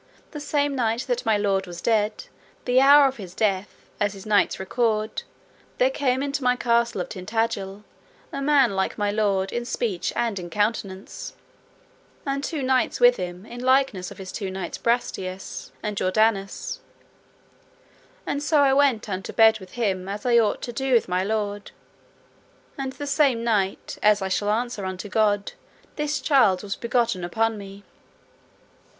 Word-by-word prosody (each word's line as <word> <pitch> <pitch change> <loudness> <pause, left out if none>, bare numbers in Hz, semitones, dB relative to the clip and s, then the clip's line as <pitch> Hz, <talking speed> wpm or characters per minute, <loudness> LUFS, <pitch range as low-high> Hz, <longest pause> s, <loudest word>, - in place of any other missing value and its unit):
The 300 - -6
same 290 -1 0
night 230 -2 0
that 245 -2 -3
my 220 -2 +4
lord 195 -2 0
was 175 -1 -8
dead, 215 +1 0 0.4
the 250 +1 +4
hour 280 +1 +8
of 270 - -4
his 185 -4 -9
death, 200 -2 -1
as 205 -1 +1
his 195 -1 -11
knights 210 -1 +2
record, 215 +2 -1 0.6
there - - +3
came 265 - 0
into 280 -1 -2
my 250 0 +3
castle 235 -4 +1
of - - -5
Tintagil 210 0 -3 0.5
a 275 - -3
man 275 -7 +3
like 190 - -1
my 205 -1 0
lord 200 -2 0
in 240 - -2
speech 225 -6 -2
and 230 -5 -1
in 175 -1 -7
countenance, 205 -1 -3 0.9
and 275 0 -2
two 295 -2 -3
knights 260 0 +1
with 245 0 +6
him 180 +1 -6
in 240 +2 -9
likeness 260 -8 +2
of - - -12
his 190 -1 -8
two 195 -3 -4
knights 190 -1 -5
Brastias 195 -6 -2
and 210 -1 -2
Jordanus, 200 +1 0 1.5
and 285 - -2
so 295 0 +3
I 270 -1 +4
went 270 -5 +3
unto 190 -2 -4
bed 220 -1 +5
with 190 -1 -13
him 195 -5 -1
as 205 +3 -5
I 240 -1 +5
ought 215 -2 0
to 240 - -5
do 265 +2 -1
with 235 - +4
my 180 +1 +1
lord, 205 0 -2 1.1
and 270 -1 -4
the 290 - -6
same 275 -5 +2
night, 205 -5 -1
as 210 -1 +5
I 190 - -2
shall 205 +2 0
answer 230 -1 -1
unto 185 +2 -5
God, 205 -1 +1 0.4
this 300 -1 -1
child 240 -11 +3
was 200 -1 -3
begotten 235 -6 0
upon 225 +6 0
me. 200 -1 -10
220 Hz, 165 wpm, -24 LUFS, 195-250 Hz, 1.5 s, hour